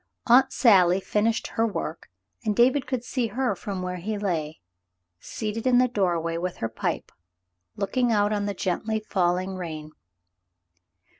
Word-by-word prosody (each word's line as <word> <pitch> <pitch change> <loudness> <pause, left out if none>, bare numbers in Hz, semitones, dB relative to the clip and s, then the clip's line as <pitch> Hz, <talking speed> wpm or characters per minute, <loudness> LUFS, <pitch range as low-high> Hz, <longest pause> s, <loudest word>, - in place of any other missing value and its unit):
Aunt 260 +2 +5
Sally 190 -6 +5
finished 220 +3 0
her 225 0 0
work, 165 -5 -5 0.3
and 210 -1 0
David 255 +3 +3
could 255 -2 -2
see 245 -1 -1
her 240 0 -1
from 190 0 -5
where 180 0 -3
he 210 +5 -3
lay, 165 -6 -2 0.6
seated 220 - -4
in 250 -1 +5
the 255 +1 +5
doorway 175 -7 0
with 180 +1 -3
her 115 - -2
pipe, 110 - -3 0.6
looking 245 +4 0
out 205 -1 +2
on 205 -1 -1
the 200 - -3
gently 215 +5 -1
falling 185 -2 0
rain. 155 -4 -6
205 Hz, 150 wpm, -25 LUFS, 180-230 Hz, 0.6 s, Aunt